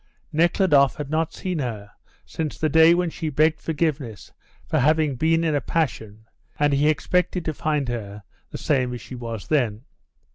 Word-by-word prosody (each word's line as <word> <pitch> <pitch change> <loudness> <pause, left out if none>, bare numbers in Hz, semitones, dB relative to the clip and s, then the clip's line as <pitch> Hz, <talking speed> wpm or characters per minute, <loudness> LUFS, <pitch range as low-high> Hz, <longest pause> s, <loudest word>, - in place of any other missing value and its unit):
Nekhludoff 160 -4 +3
had 150 -1 -6
not 160 0 0
seen 180 -4 -4
her 110 -6 -5 0.3
since 155 -3 -4
the 155 - 0
day 160 +2 +6
when 175 -1 0
she 160 -1 -4
begged 155 +2 +2
forgiveness 150 - -3 0.3
for - - 0
having 150 0 +2
been 165 +5 +2
in 160 -2 +1
a 145 - +1
passion, 110 -9 -3 0.3
and 145 -1 +2
he 145 +2 +3
expected 175 +4 0
to 155 - -1
find 150 -2 -1
her 105 -4 -5 0.3
the - - -7
same 130 -4 0
as 120 - -8
she - - -11
was 115 -4 -6
then. 120 -7 0
150 Hz, 175 wpm, -23 LUFS, 125-160 Hz, 0.3 s, day